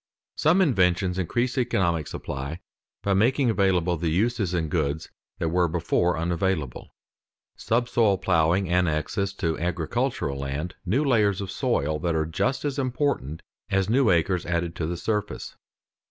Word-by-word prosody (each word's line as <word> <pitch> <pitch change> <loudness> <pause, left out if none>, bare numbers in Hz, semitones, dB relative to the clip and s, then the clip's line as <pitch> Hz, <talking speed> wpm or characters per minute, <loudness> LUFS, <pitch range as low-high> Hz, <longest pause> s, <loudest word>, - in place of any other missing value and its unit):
_ - - -69 0.4
Some 170 +5 +4
inventions 95 - +2
increase 120 +8 0
economic 85 - 0
supply 70 +5 -5 0.4
by 100 - +1
making 120 +5 +3
available 90 -4 +2
the 85 +1 -1
uses 100 +2 +1
in 85 -3 0
goods 75 +1 -1 0.3
that 80 - -1
were 90 +1 +2
before 85 +1 +1
unavailable. 85 -4 -2 0.6
Subsoil 115 -3 +1
ploughing 90 +1 +2
annexes 90 +3 0
to 80 -4 -1
agricultural 85 - -1
land 70 +5 -4
new 130 +11 +2
layers 105 -7 +3
of 100 -2 -4
soil 75 +2 0
that 85 0 -1
are 80 0 +1
just 130 - -1
as 145 -1 -1
important 130 - -1 0.3
as 95 +1 +1
new 130 -1 +4
acres 90 +1 +2
added 85 -1 -2
to 80 - -2
the 85 +1 -3
surface. 105 +1 -3
90 Hz, 145 wpm, -25 LUFS, 80-110 Hz, 0.6 s, Some